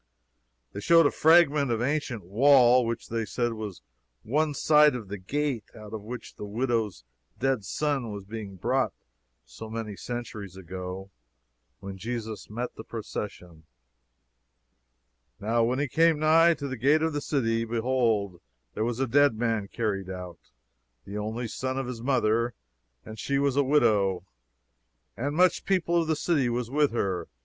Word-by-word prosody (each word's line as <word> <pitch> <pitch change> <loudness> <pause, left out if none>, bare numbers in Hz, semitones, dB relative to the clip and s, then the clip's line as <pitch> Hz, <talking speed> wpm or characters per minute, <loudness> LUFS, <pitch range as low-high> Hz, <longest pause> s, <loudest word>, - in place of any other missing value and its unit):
They - - -5
showed 165 +8 +5
a - - +4
fragment 155 -4 +4
of 115 -2 0
ancient 130 -3 -1
wall 125 +4 +5
which 115 0 -4
they 115 0 -1
said 120 +1 -1
was 105 - -7 0.4
one 150 +5 0
side 150 -2 +5
of 110 -6 -7
the 100 0 -5
gate 135 +2 -2
out 105 -1 -11
of 110 - -5
which 120 +4 -8
the - - -7
widow's 110 - -1 0.4
dead 130 -4 +1
son 135 +2 -1
was 100 -2 -7
being 105 -2 -7
brought 125 +2 0 0.5
so - - -10
many 110 -2 -5
centuries 110 -5 -6
ago 95 +1 -7 0.7
when 95 0 -8
Jesus 110 -1 -5
met 120 +3 -4
the 110 - -9
procession: 90 -8 -7 1.7
"Now 115 +3 +1
when 125 +2 0
he 145 +1 0
came 165 +3 +3
nigh 165 +2 +5
to 140 - -5
the 130 -1 -5
gate 145 +7 +3
of 160 -1 0
the 145 - -2
city, 115 -6 0
behold 115 -5 0 0.3
there 110 - -2
was 120 +1 -2
a 135 - +2
dead 140 0 +4
man 115 -3 0
carried 100 -4 -2
out, 90 -2 -7 0.7
the 100 +2 -5
only 110 +3 -3
son 130 +3 -3
of 135 - -2
his 120 -2 -6
mother, 120 -2 +1 0.5
and 110 0 -9
she 140 - -1
was 140 -1 +1
a 140 - +4
widow: 100 -10 +2 0.9
and 145 +5 -3
much 180 +2 +3
people 170 -3 +1
of 165 - -3
the 160 - +1
city 145 -5 +1
was 120 0 -2
with 145 0 +3
her. 95 -7 -2
115 Hz, 160 wpm, -27 LUFS, 105-140 Hz, 1.7 s, showed